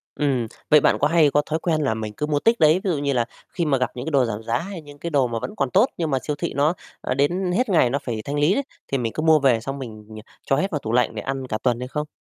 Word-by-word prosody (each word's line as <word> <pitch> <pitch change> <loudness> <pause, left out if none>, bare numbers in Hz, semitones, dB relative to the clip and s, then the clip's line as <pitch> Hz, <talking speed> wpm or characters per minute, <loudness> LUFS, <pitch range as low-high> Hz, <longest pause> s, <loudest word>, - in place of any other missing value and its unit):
Ừm, 130 -6 0 0.2
vậy 150 - +7
bạn - - +3
có 145 - +3
hay 155 -2 +4
có 145 - +3
thói 160 +1 -2
quen 160 -3 0
là 135 -6 +1
mình 110 -1 -5
cứ 150 - -1
mua 150 -1 0
tích 230 +8 +2
đấy, 155 0 +6
ví 195 - 0
dụ 160 - 0
như 140 -1 0
là 120 -2 +1 0.2
khi 170 - -2
mà 145 -3 +2
gặp 125 - -1
những 125 +1 -5
cái 160 - -3
đồ 135 -3 +3
giảm 110 -1 -4
giá 115 +1 0
hay 190 -1 -6
những 145 -1 -13
cái 170 - -4
đồ 140 -5 +2
mà 115 -1 -3
vẫn 125 -1 -6
còn 135 +3 0
tốt, 200 +5 +5
nhưng 165 -2 -1
mà 135 - +1
siêu 150 - -2
thị - - -4
nó, 145 +4 +3 0.3
a, - - -1
đến 175 +7 +1
hết 245 +6 +1
ngày 160 -10 +4
nó 140 +3 -1
phải 115 -3 -3
thanh 145 +1 -2
lý 150 +6 +4
đấy, 280 - 0 0.2
thì 135 - -1
mình 115 -3 -2
cứ 155 - -3
mua 160 -1 +5
về 130 -5 +3
xong 135 +4 -5
mình, 110 -5 -8
ừ, 110 - -10 0.3
cho 135 - +2
hết 190 +8 -1
vào 150 - -1
tủ 110 - -5
lạnh 125 0 +2
để - - -3
ăn 135 -1 -4
cả 110 - -2
tuần 120 -2 +1
hay 125 - -4
không? 150 +3 -3
140 Hz, 330 wpm, -23 LUFS, 125-155 Hz, 0.3 s, vậy